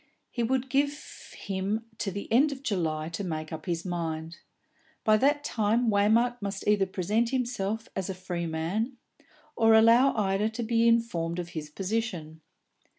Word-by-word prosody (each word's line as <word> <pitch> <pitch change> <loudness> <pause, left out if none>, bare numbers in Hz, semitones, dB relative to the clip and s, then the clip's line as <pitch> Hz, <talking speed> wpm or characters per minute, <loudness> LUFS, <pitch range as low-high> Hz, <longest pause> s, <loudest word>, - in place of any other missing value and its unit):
He 240 - -3
would 260 +2 0
give 285 +2 -2
him 200 +3 -2
to 200 - -1
the 200 +2 -5
end 285 +5 +5
of 275 -1 -7
July 160 - -1
to 170 +4 -4
make 155 -2 -4
up 155 +2 -7
his 170 0 -2
mind; 165 -2 -4 0.7
by 215 - +5
that 290 +5 +2
time 225 -2 +1
Waymark 225 +4 +3
must 200 0 -4
either 205 -2 +3
present 210 +6 0
himself 230 -4 -2
as 190 -1 -3
a 190 - -3
free 175 -2 -4
man, 190 +11 -2 0.6
or 225 0 +5
allow 230 +4 +6
Ida 205 0 +1
to 230 +2 -4
be 230 0 +2
informed 180 -8 +1
of 175 -1 -4
his 155 -3 -6
position. 185 -4 -3
205 Hz, 160 wpm, -28 LUFS, 175-235 Hz, 0.7 s, allow